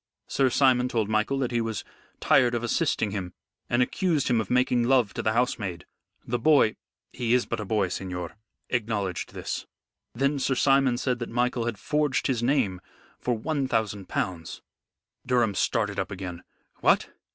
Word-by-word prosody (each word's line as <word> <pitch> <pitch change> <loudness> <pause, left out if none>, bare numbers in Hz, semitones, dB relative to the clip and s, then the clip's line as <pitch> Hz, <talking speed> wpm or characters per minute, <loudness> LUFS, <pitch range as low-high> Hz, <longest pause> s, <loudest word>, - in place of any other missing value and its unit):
Sir 135 -1 +2
Simon 125 -1 +3
told 110 -4 -1
Michael 110 +5 +1
that 130 -3 -1
he 120 -1 +1
was 115 -2 -3 0.4
tired 120 -1 +4
of 120 - -2
assisting 110 -2 0
him, 95 -3 -4 0.4
and 120 +1 +3
accused 165 -1 0
him 120 -2 +3
of 105 - -7
making 125 -1 +3
love 120 -3 +3
to - - -3
the 110 - +1
housemaid. 105 -7 -1 0.4
The 120 +1 -1
boy 140 -4 +4 0.4
he 120 0 +1
is 125 - +2
but - - -3
a 105 - -4
boy, 100 -1 +1
signor 90 -2 -5 0.4
acknowledged 105 -7 -2
this. - - -4 0.5
Then 140 +3 +1
Sir 135 0 +1
Simon 135 -2 +3
said 125 -1 -1
that 120 - -4
Michael 120 0 0
had 115 -3 -2
forged 150 +5 0
his 125 -4 0
name 120 -8 +1 0.4
for 125 -2 -1
one 140 +3 -1
thousand 105 -5 -1
pounds." 85 -3 -3 0.6
Durham 120 -4 +2
started - - 0
up - - -2
again. 90 -3 -6 0.4
"What! - - +3
120 Hz, 170 wpm, -26 LUFS, 105-130 Hz, 0.6 s, tired